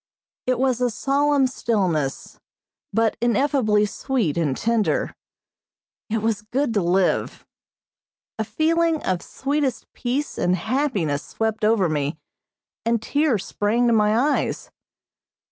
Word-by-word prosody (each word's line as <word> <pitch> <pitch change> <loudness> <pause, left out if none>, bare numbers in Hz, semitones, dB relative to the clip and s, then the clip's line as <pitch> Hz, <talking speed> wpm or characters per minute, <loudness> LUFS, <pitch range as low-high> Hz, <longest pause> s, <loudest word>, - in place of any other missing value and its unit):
It 255 -1 +2
was 255 -1 +1
a 250 - +3
solemn 280 +4 +2
stillness, 185 - -1 0.5
but 225 -1 +1
ineffably 240 -3 +2
sweet 220 - -1
and 150 -6 0
tender. 230 -2 0 1.0
It 220 0 -1
was 220 -2 0
good 245 +4 -1
to 205 - +2
live. 180 +2 0 0.9
A - - +1
feeling 320 +8 +1
of 185 -2 -1
sweetest 275 -4 -2
peace 265 +4 -3
and 180 +1 +2
happiness 205 - -1
swept 220 +3 -3
over 210 -4 +3
me, 150 -1 -1 0.7
and 230 +1 +1
tears 270 -2 0
sprang 220 +4 0
to 235 - +3
my 210 0 +3
eyes. 285 +5 0
225 Hz, 120 wpm, -23 LUFS, 205-265 Hz, 1.0 s, a